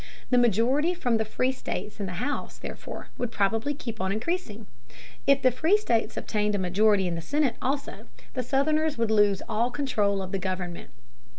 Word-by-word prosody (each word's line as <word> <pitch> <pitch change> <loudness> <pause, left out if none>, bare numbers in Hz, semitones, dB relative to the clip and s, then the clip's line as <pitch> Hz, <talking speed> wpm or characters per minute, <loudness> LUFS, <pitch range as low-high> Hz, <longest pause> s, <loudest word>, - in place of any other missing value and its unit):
The 250 - +5
majority 245 - +3
from 245 -9 +1
the 220 - 0
free 255 +4 0
states 220 -4 -5
in 200 - -2
the 180 - -5
House, 285 +11 -3
therefore, - - -8
would 245 - -1
probably 225 +7 +1
keep 230 -7 -6
on 190 0 0
increasing. 225 - -3 0.6
If 275 0 +4
the 255 - +6
free 320 - +3
states 235 - 0
obtained 210 -1 0
a - - +1
majority 195 +2 +3
in 175 - -1
the 165 - -3
Senate 280 - +1
also, 280 +2 -3 0.3
the 255 - -1
Southerners 300 +4 +1
would 230 -1 +1
lose 205 -3 +3
all 230 +1 +1
control 210 -8 0
of 185 - -7
the 195 - -1
government. 185 -2 -4
225 Hz, 185 wpm, -27 LUFS, 200-275 Hz, 0.6 s, the